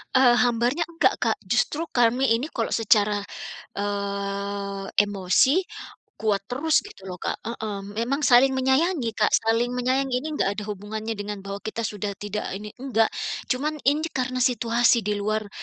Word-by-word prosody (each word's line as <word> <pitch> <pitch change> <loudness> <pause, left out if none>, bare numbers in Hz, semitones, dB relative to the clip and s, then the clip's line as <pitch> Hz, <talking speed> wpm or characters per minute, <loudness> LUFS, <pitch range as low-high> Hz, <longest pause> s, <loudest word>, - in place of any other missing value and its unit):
Eee, 245 -2 +6
hambarnya 245 +7 +1
enggak, 335 -1 +2
Kak. - - 0
Justru 325 +3 0
kami 240 0 +3
ini 260 - -3
kalau 230 - -1
secara, 210 -2 +3 0.6
eee, 200 0 -3 0.2
emosi 205 - +2 0.6
kuat 210 -3 +1
terus, 305 +9 +1
gitu 195 - -11
loh, 180 - -6
Kak - - -3
heeh, 220 -3 -4 0.2
memang 270 +6 0
saling 265 0 +5
menyayangi, 265 +1 +2
Kak, 210 - +2
saling 230 +2 +2
menyayangi 255 +1 0
ini 310 - -5
enggak 195 - +1
ada 210 - -5
hubungannya 215 +2 -4
dengan 205 -1 -5
bahwa 200 0 -5
kita 225 +1 -3
sudah 205 -2 -3
tidak 205 +1 -3
ini, 210 +1 -8
enggak. 240 -4 +1 0.4
Cuman 295 +3 -1
ini 305 +3 0
karena 255 -1 -2
situasi 240 -1 +3
di 210 +1 -1
luar 215 0 -2
230 Hz, 155 wpm, -25 LUFS, 205-260 Hz, 0.6 s, Eee